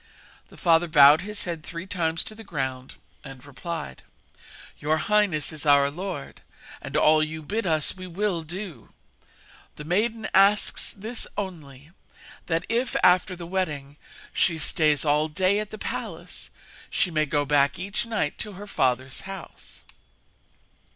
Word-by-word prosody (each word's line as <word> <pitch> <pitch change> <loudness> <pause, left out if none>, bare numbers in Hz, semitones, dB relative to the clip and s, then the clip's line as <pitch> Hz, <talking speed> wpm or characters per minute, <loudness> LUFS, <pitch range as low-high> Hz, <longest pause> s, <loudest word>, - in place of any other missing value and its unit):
The - - -17
father 170 0 +3
bowed 150 -1 +7
his 210 +1 -6
head 170 -3 -4
three 170 +3 -7
times 165 -4 0
to - - -8
the 225 +1 -11
ground, 130 -8 -4 0.3
and 135 -1 -11
replied: 145 - -6 0.8
'Your 155 +2 +1
highness 195 -6 +1
is 155 - -4
our 140 -1 +5
lord, 180 -2 -6 0.4
and - - -3
all 155 0 +5
that 155 - +1
you 160 0 -7
bid 210 +6 -2
us 155 -2 +1
we 185 0 -8
will 180 -1 -1
do. 170 - -8 0.9
The 150 - -8
maiden 215 +7 0
asks 200 +2 +4
this 220 +4 -3
only 155 -7 -7 0.6
that 165 0 0
if, 240 +3 -1
after 180 +1 +4
the 175 -1 -8
wedding, 150 -6 -3 0.4
she 170 -3 +2
stays 155 -1 +3
all 150 +1 +3
day 185 +6 +1
at 215 -1 -4
the 215 - -8
palace, - - -6 0.4
she 180 - +1
may 155 -1 +1
go 145 0 +1
back 140 -1 +3
each 200 +5 -3
night 205 -10 -2
to 210 - -4
her 200 +2 -9
father's 130 -6 -1
house.' 195 0 -10
165 Hz, 150 wpm, -25 LUFS, 150-195 Hz, 0.9 s, bowed